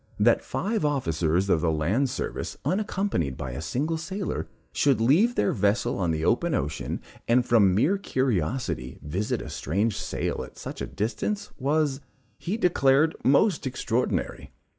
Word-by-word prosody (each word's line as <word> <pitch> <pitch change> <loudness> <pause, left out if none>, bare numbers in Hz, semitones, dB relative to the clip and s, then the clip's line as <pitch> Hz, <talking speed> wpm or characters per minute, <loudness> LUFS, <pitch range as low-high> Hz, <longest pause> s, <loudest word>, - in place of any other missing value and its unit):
That - - +4
five 215 -2 -2
officers 90 - +1
of 85 -5 +2
the 85 -1 +2
land 95 - +1
service, - - -4
unaccompanied 185 - -1
by 65 - -5
a 65 - -5
single 145 - -1
sailor, 190 +4 -3 0.3
should 140 -4 +3
leave 170 - +4
their - - +2
vessel 100 0 +1
on 90 -3 +1
the 80 0 -1
open - - +2
ocean, 70 +3 -3 0.3
and 120 +1 +4
from 100 -7 +4
mere 165 - +2
curiosity, 120 - -1
visit 90 +8 -2
a - - -8
strange 100 - 0
sail 100 -2 -3
at - - -12
such - - -7
a - - -2
distance, 115 - -3
was, 145 0 +1 0.4
he 195 +6 -2
declared, 155 -5 +3
most 145 +3 +3
extraordinary. 125 -1 -2
125 Hz, 150 wpm, -26 LUFS, -, 0.4 s, That